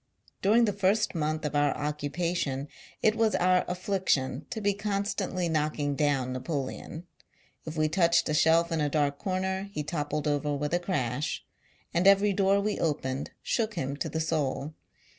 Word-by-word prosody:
During 225 +4 +5
the 205 - 0
first 200 +2 +2
month 155 -1 -1
of 150 - -2
our 145 -1 +2
occupation, 150 -1 -2 0.4
it 215 - +5
was 225 -1 +2
our 180 0 +3
afflic 185 +1 -3
tion 130 +1 +1
to 225 - -4
be 205 -1 +1
constantly 200 -3 -2
knocking 150 -2 0
down 135 -3 +1
Napo 130 +4 -3
leon: 135 +4 -6 0.6
if 160 0 -6
we 155 0 +3
touched 170 0 +3
a 150 - 0
shelf 165 +2 +4
in 165 -2 0
a 150 - +1
dark 145 -1 0
corner, 190 0 -2
he 150 -6 -3
toppled 150 0 -2
over 145 0 0
with 150 +3 -2
a 175 - +3
crash; 145 -6 -2 0.5
and 175 +3 +3
every 200 +1 +5
door 195 +1 +3
we 210 +1 -1
opened, 140 -4 -1
shook 225 -2 -1
him 135 +1 -2
to - - -3
the 160 - -2
soul. 155 -2 -1
160 Hz, 175 wpm, -28 LUFS, 145-190 Hz, 0.6 s, During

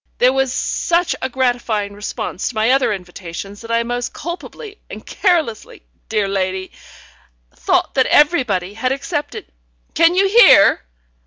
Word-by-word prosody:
There 250 +1 +3
was 270 -1 0
such 345 +6 0
a 260 - -2
gratifying 240 -5 -1
response 205 -2 -5
to 250 - -10
my 220 +3 +2
other 265 -3 +2
invitations 185 +1 -8
that 230 - -11
I 230 0 +1
most 245 +1 -4
culpably 400 +5 -8
and - - -10
carelessly, 325 - -1 0.3
dear 215 -2 0
lady, 190 -1 -3 0.8
thought - - 0
that 260 - +2
everybody 245 - +2
had 255 +4 -2
accepted. 275 +2 -4 0.5
Can 335 +2 +4
you 390 +1 +3
hear?" 400 - +6
245 Hz, 140 wpm, -18 LUFS, 205-295 Hz, 0.8 s, hear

